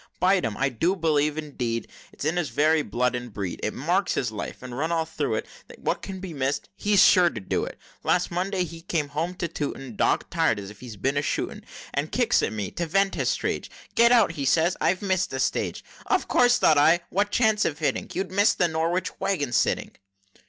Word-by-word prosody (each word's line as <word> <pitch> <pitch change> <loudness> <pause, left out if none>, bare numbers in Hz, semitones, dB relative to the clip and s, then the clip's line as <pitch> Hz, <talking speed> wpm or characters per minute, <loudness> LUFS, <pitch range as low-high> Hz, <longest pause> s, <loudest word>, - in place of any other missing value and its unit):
Bite 185 0 +3
him! 105 -2 -3
I 140 +1 +1
do 165 - 0
believe, 150 -3 +1
indeed, 125 -7 -3 0.2
It's - - -7
in 160 +3 0
his 175 -4 0
very 155 +1 +3
blood 125 +1 0
and 120 -1 -5
breed! 100 -3 -4
It 105 - -1
marks 180 +7 0
his 120 -4 -1
life, 110 +3 -6
and, 125 -1 -7
run 160 +5 -1
all 165 -1 +1
through 160 - -2
it; - - -2 0.3
What - - -2
can 190 -1 -6
be 185 -3 -7
miss'd, 140 0 -2
he's 205 -1 +4
sure 180 -2 +6
to - - -6
do 95 - -1
it. - - -8 0.2
Last 180 0 +1
Monday 185 +2 -1
he 165 -1 -8
came 160 -4 -2
home 165 +5 -2
to 175 - -2
Tooting, 140 -6 -5
Dog - - +1
tir'd, 165 -9 +2
as 100 0 -8
if 105 - -15
he'd 110 -6 -10
been 135 +2 +1
a - - +2
shooting, - - -3 0.3
And - - -2
kicks - - +2
at - - -1
me 105 -3 -4
to 170 - -3
vent 195 +3 +2
his - - -1
rage - - -2 0.2
'Get 235 +1 +5
out!' 235 -8 +5
says 160 +6 +3
he - - -7
'I've 185 +3 +1
miss'd 185 -2 +1
the 130 - -4
stage!' - - -1 0.2
Of - - +1
course, 245 0 +4
thought 155 -2 +4
I 165 +4 +5
what 200 +3 +1
chance 220 -1 +3
of 145 - -1
hitting? 155 -2 -1
You'd 190 0 -3
miss 200 +3 +3
the 175 - +2
Norwich 165 +3 -1
wagon, 145 -10 -1
sitting!" - - +1
160 Hz, 225 wpm, -25 LUFS, 135-185 Hz, 0.3 s, sure